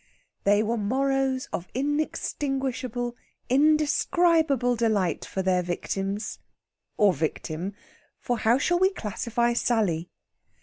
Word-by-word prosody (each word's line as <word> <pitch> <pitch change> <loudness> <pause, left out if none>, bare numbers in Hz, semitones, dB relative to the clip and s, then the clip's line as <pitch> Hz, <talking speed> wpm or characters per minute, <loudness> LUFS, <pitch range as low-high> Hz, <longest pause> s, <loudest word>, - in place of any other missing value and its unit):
They 205 +1 +4
were 230 +2 -1
morrows 265 +4 0
of 180 - -3
inextinguishable, 265 -3 -2 0.3
indescribable 305 -1 +3
delight 220 -6 0
for 190 - -3
their 185 -1 +2
victims 195 +4 -3 0.6
or 205 -5 +5
victim 160 +5 -3 0.4
for 245 -2 -2
how 225 +3 +4
shall 350 +5 +1
we 375 +1 +5
classify 235 - -1
Sally? 205 -9 0
240 Hz, 100 wpm, -26 LUFS, 200-270 Hz, 0.6 s, or